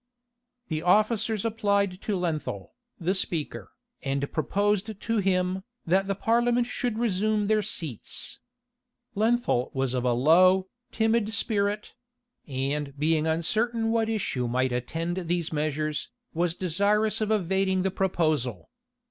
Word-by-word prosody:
The 155 -2 -1
officers 215 +3 +2
applied 200 -4 +1
to 210 - -1
Lenthal, 155 - -3 0.3
the 180 +3 +1
speaker, 150 - -2 0.3
and 140 +1 -2
proposed 205 +4 0
to 225 0 -1
him, 185 -1 +1 0.2
that 190 +3 +2
the 195 - 0
parliament 240 +3 +2
should 245 -2 -2
resume 215 -1 +1
their 215 +1 +2
seats. 160 - -3 0.7
Lenthal 220 - +1
was 135 -1 0
of 125 -1 -1
a 125 -1 +2
low, 185 +9 +5 0.2
timid 225 -1 +1
spirit; 210 -1 -1 0.5
and 140 +1 -2
being 155 +1 +2
uncertain 225 +8 +1
what 225 -1 +1
issue 155 - -1
might 130 +2 +1
attend 165 +8 -2
these 170 -1 -1
measures, 155 0 -1 0.2
was 170 0 0
desirous 200 +5 +1
of 215 - 0
evading 190 -2 +1
the 190 - 0
proposal. 155 - -1
185 Hz, 125 wpm, -27 LUFS, 155-215 Hz, 0.7 s, low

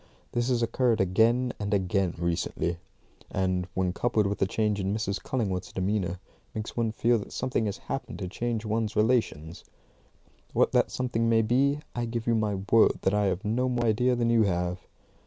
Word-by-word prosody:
This 120 +1 0
has 120 -2 +2
occurred 120 0 +1
again 115 +7 +3
and 100 -1 0
again 95 -2 0
recently; 85 0 -1 0.5
and, 95 -1 -1
when 95 -1 0
coupled 110 -2 +1
with 100 +1 -1
the 95 - +2
change 105 0 0
in 95 +1 -1
Mrs. 100 -3 -2
Cullingworth's 100 -8 -2
demeanour, 95 -2 -1 0.4
makes 110 +1 -5
one 115 -2 0
feel 115 +1 +2
that 100 - -9
something 125 -3 -1
has 100 - -3
happened - - -5
to 95 - -4
change 115 +3 -3
one's 110 0 -1
relations. 105 -8 0 0.9
What - - +3
that - - +3
something 115 -3 -1
may 115 -1 +4
be, 140 +6 +2
I 120 -1 -1
give 115 0 -4
you 120 - +2
my 105 -2 +1 0.2
word 115 -1 +6
that 95 - +2
I 105 0 +2
have 95 +1 -1
no 125 +4 +1
more 120 -1 0
idea 125 +3 +2
than 120 -1 +1
you 115 -1 +4
have. 90 -2 0
110 Hz, 185 wpm, -28 LUFS, 95-120 Hz, 0.9 s, word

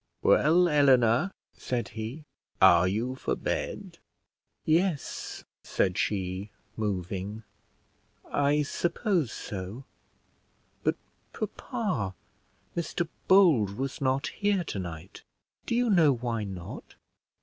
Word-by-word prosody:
"Well, 175 +4 +5
Eleanor," 135 - +4 0.2
said 125 -2 -3
he, 115 +8 -6 0.3
"are 90 -1 +7
you 115 +7 -1
for 130 - -2
bed?" - - -4 0.7
"Yes," 165 -2 0 0.2
said 95 -2 0
she, 95 0 -2 0.3
moving, 100 +1 -3 0.8
"I 145 +1 +2
suppose 175 - 0
so; 100 +6 -6 1.0
but - - +2 0.4
papa 185 - -3 0.6
Mr 170 0 -2 0.2
Bold 150 - +5
was 135 +1 -3
not 135 0 +1
here 200 -3 0
tonight; 90 - -6 0.5
do 235 - 0
you 245 0 +2
know 170 -9 +5
why 115 -3 -2
not?" 95 -3 -8
125 Hz, 95 wpm, -28 LUFS, 100-165 Hz, 1.0 s, are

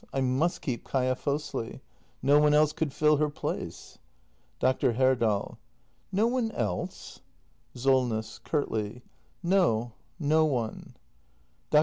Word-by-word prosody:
I - - -4
m 130 0 +1
u - - +5
s 175 - -1
t - - -18
keep 120 - -5
Kaia 130 -1 0
Fosli. 145 -3 -3 0.4
No 145 +2 +5
one 150 0 +4
else 150 0 +4
could 160 -3 -2
fill 150 +2 +3
her 150 0 +1
place. 145 - -6 0.6
Dr. 130 -1 +2
Herdal. 120 -5 +1 0.5
No 200 +4 +2
one 240 -1 +1
else? 105 -7 -4 0.6
Solness. 125 -4 +1
[Curtly.] 120 -6 -2 0.4
No, 170 - +2 0.3
no 155 +1 +3
one. 125 -8 -2 0.7
Dr. 150 - +6
135 Hz, 130 wpm, -28 LUFS, 120-150 Hz, 0.7 s, Dr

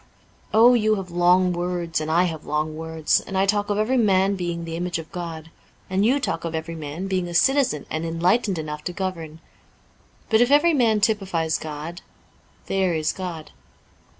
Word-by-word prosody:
Oh, 230 +3 +6
you 215 -2 +3
have 190 -3 -6
long 180 +1 +3
words 175 -2 -2
and 155 - -4
I 170 +3 +3
have 160 -4 -3
long 155 +1 -2
words; 160 -1 0
and 195 - -6
I 190 - +3
talk 205 +1 0
of 205 - 0
every 225 +5 +1
man 195 -3 +3
being 170 -2 -4
the 165 0 -5
image 175 +1 -2
of 165 -1 -9
God; 165 -2 -7 0.4
and 190 +1 +1
you 255 +6 +3
talk 275 - -3
of 165 -1 -4
every 160 +1 -4
man 155 +3 -6
being 185 -2 -1
a 175 - -6
citizen 260 - +2
and 160 +1 -3
enlightened 180 +5 +1
enough 150 -1 -5
to 180 - -3
govern. 165 -4 -5 0.9
But, 220 0 +3
if 240 - +4
every 295 +4 +5
man 225 -6 +2
typifies 195 -7 0
God, 155 +3 -7 0.6
there 190 -3 0
is 155 -1 0
God. 175 -4 -6
175 Hz, 185 wpm, -23 LUFS, 160-205 Hz, 0.9 s, Oh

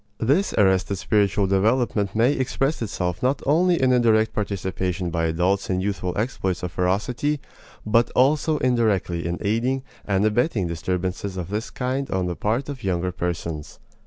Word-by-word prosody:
This 145 - +2
arrested 95 0 +3
spiritual 100 0 +1
development 105 +1 +1
may 120 +5 +4
express 135 +2 -1
itself 90 -5 -2
not 130 +2 +1
only 170 +4 +3
in 130 -1 +3
a 125 - +4
direct 110 -2 +3
participation 95 -3 -2
by 80 0 0
adults 90 +5 0
in 90 -1 +1
youthful 95 -2 -2
exploits 95 -6 -2
of 90 - -3
ferocity, 110 - 0 0.5
but 115 +2 +3
also 150 +4 +3
indirectly 110 - +1
in 85 +1 -2
aiding 120 +6 0 0.2
and 100 0 +1
abetting 110 - +1
disturbances 90 +3 -3
of 90 -1 -4
this 105 +3 -3
kind 130 +2 -2
on 95 -1 0
the 90 -1 -2
part 115 +9 -1
of 140 -3 -7
younger 90 -1 -1
persons. 85 -3 -4
105 Hz, 160 wpm, -23 LUFS, 90-125 Hz, 0.5 s, may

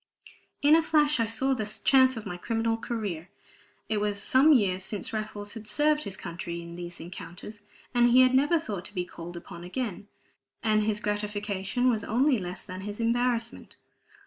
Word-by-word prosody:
In 295 +2 +7
a 330 - +5
flash 300 -3 +3
I 230 - +2
saw 265 +4 +1
the 215 -4 -1
chance 260 -2 +5
of 220 - -6
my 180 - -4
criminal 225 +4 -1
career. 205 -7 -4 0.6
It 215 -2 -1
was 205 -1 0
some 270 +8 +5
years 190 -9 +3
since 205 +2 -3
Raffles 210 -1 -5
had 220 -2 -9
served 300 +6 +2
his 195 -1 -4
country 170 0 -6
in 170 0 -9
these 175 0 -8
encounters; 180 +4 -9 0.3
he 240 +1 +6
had 255 0 +5
never 290 +6 +4
thought 205 - -5
to 210 - -7
be 180 -1 -1
called 175 0 -9
upon 170 0 -10
again, 205 +1 -4 0.6
and 215 -1 +3
his 210 0 0
gratification 205 +2 -1
was 225 -4 +2
only 255 +2 +2
less 180 -1 -6
than 185 0 -7
his 205 +2 -6
embarrassment. 235 0 -1
215 Hz, 175 wpm, -28 LUFS, 190-250 Hz, 0.6 s, In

